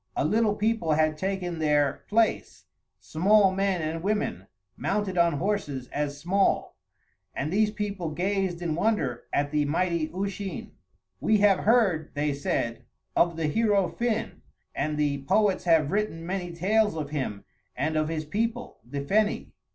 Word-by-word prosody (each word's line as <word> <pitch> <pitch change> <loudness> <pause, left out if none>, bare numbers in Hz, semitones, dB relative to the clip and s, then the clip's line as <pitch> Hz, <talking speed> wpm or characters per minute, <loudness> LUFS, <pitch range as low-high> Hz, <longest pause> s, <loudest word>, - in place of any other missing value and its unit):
A - - 0
little 215 +4 +2
people 215 -7 +1
had 155 0 +2
taken 180 -1 -3
their 145 -3 +1
place, 225 +1 0 0.3
small 195 +4 +3
men 195 -3 0
and 160 +1 -3
women, 210 +3 -2 0.3
mounted 200 -2 -1
on 170 -2 +3
horses 145 -7 -2
as 145 -1 -3
small; 190 +6 +1 0.6
and 150 +5 -2
these 215 +1 +3
people 205 -5 -3
gazed 185 +1 -1
in 165 -2 -1
wonder 175 - 0
at 145 0 0
the 150 -1 +2
mighty 170 +1 0
Usheen. 195 +1 -4 0.5
"We 215 - +3
have 200 -2 +4
heard," 200 -11 +2
they 145 0 0
said, 115 -4 -2 0.3
"of 170 -1 +3
the 165 - -1
hero 205 +2 +2
Finn, 235 -2 -2 0.3
and 150 +2 -2
the 145 -2 0
poets 200 +4 +2
have 160 -4 +3
written 200 -5 -1
many 180 -1 -3
tales 210 +4 +1
of 150 -2 -4
him 130 -9 -3 0.3
and 155 +5 -1
of 155 0 +1
his 155 -1 -3
people, 230 +8 -3
the 140 +5 -5
Feni. 205 +9 0
175 Hz, 150 wpm, -27 LUFS, 150-205 Hz, 0.6 s, have